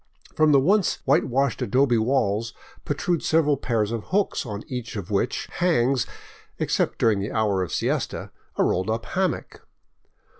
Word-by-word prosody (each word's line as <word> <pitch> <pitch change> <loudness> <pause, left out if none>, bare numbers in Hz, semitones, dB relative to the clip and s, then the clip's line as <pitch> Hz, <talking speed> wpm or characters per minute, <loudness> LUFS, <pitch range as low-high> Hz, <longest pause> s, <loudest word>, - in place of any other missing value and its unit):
From 155 -1 +4
the 140 - +6
once 195 +7 +2
white 140 +6 +3
washed 135 0 0
adobe 125 +1 +2
walls 115 -2 0 0.3
protrude 155 +4 -1
several 155 -2 +3
pairs 115 -5 -1
of 115 -2 -4
hooks 195 -8 0
on 105 -1 -5
each 125 -2 -6
of 100 -2 -6
which 105 +5 -1
hangs, 135 -8 +2 0.5
except - - 0
during 110 -3 +2
the 100 +2 -3
hour 105 -4 +1
of 90 - -3
siesta, - - -2 0.3
a - - +3
rolled 95 +4 0
up 110 0 -2
hammock. 185 -2 -2
120 Hz, 155 wpm, -24 LUFS, 110-150 Hz, 0.5 s, the